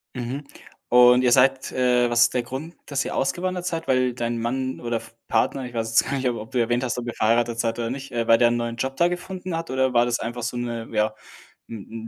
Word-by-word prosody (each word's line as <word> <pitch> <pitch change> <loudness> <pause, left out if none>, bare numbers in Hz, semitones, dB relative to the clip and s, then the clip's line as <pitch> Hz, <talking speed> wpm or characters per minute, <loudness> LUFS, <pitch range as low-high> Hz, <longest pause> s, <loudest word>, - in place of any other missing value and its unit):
Mhm, 125 +4 -4 0.4
und 125 +1 +6
ihr 125 - +3
seid 135 0 +3
äh, 125 -1 +2
was 120 0 +2
ist 120 - +5
der 125 -1 0
Grund, 140 +7 -7
dass 140 -1 -1
ihr - - -5
ausgewandert 180 +4 -1
seid? 165 -2 -3
Weil 130 -1 +2
dein 120 -1 -2
Mann 130 +3 -2
oder 120 -1 -2
F 115 0 -11
Partner, 135 -2 0
ich 120 - -9
weiß 115 -1 -2
jetzt 115 - +3
gar 140 - -1
nicht, 130 -2 0
ob 120 - -3
ob 110 +1 -9
du 125 - -2
erwähnt 120 +2 0
hast, 120 - -2
ob 120 - -4
ihr 120 - -3
verheiratet 115 +1 +1
seid 115 -1 0
oder 115 -1 -2
nicht, 135 0 -6
äh, 115 -1 0
weil 115 0 +6
der 120 - +5
'n 120 - +1
neuen 120 0 -3
Job 135 +3 -2
da 175 0 +3
gefunden 180 -1 -5
hat, 165 -3 -5
oder 130 0 +1
war 120 0 +4
das 120 -1 -1
einfach 120 +1 -4
so 120 +1 -3
'ne 120 -2 -4
ja, 105 0 +1 0.6
'n 115 +1 -8
120 Hz, 260 wpm, -24 LUFS, 115-130 Hz, 0.6 s, und